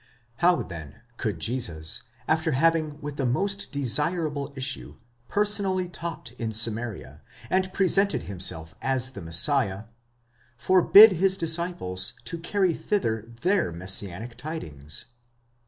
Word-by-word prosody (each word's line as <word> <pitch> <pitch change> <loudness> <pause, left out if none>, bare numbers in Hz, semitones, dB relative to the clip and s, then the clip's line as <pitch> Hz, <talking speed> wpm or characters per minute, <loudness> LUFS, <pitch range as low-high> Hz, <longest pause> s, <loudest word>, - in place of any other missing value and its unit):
How, 175 +1 +4
then, 85 -2 -10 0.2
could 105 -7 -3
Jesus, 85 -7 -1 0.3
after 160 0 +1
having 155 +1 +1
with 145 0 -6
the 135 - -1
most 195 +10 -1
desirable 145 +2 0
issue, 135 0 -2 0.3
personally 200 -3 +1
taught 170 -7 -6
in 115 -1 -2
Samaria, 110 0 -2 0.3
and 185 0 +1
presented 195 +1 +2
himself 85 -4 -3
as 130 -1 0
the 100 - -9
Messiah, 95 - +1 0.7
forbid 190 - +8
his 190 +2 +2
disciples 165 - -1
to 170 - -3
carry 185 +1 +1
thither 115 - -2
their 185 - +2
messianic 95 +5 -1
tidings? 75 - -4
140 Hz, 115 wpm, -26 LUFS, 105-180 Hz, 0.7 s, forbid